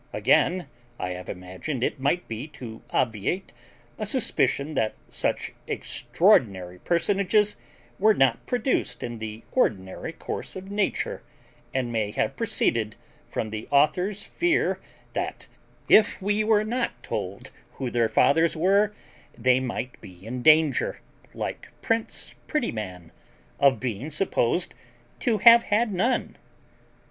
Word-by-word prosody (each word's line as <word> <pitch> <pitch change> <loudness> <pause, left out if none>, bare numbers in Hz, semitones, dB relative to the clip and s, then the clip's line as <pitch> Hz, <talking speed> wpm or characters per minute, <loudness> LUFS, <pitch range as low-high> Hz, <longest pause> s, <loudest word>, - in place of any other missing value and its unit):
Again, 180 -1 +3 0.3
I 90 - -2
have 90 0 -7
imagined 95 - -5
it - - -1
might 140 +7 0
be 115 +5 -5
to 115 -4 -8
obviate 115 - -1 0.5
a - - -2
suspicion 155 - +1
that 110 -6 0
such - - -1 0.2
extraordinary 90 -5 +1
personages 200 - +2 0.4
were 215 +2 +5
not 130 -7 +3
produced 245 +1 0
in 120 -1 -5
the 110 0 -6
ordinary 95 - 0
course - - -6
of 190 +1 -8
nature, 205 -1 -1 0.5
and 130 -2 -1
may 110 -3 0
have - - -1
proceeded 110 -2 0 0.3
from 110 - -3
the 110 0 -5
author's 180 +8 +2
fear 345 +8 +1 0.3
that, - - -4 0.4
if 215 -1 +5
we 205 +2 +1
were 215 -1 +3
not 240 +4 -2
told - - -5 0.2
who 130 -3 -4
their 115 -2 +2
fathers 165 +8 +3
were, 200 +5 +3 0.4
they 125 +2 +4
might 125 -1 -4
be 90 +1 -13
in 125 +2 -4
danger, 155 -1 +4 0.4
like - - -4 0.2
prince 225 0 -1
Prettyman, 105 - -3 0.5
of 140 -1 +4
being 125 +3 -3
supposed 155 -2 0 0.5
to 230 -4 +1
have 235 +3 +8
had 215 0 +1
none. 235 +7 0
140 Hz, 125 wpm, -26 LUFS, -, 0.5 s, have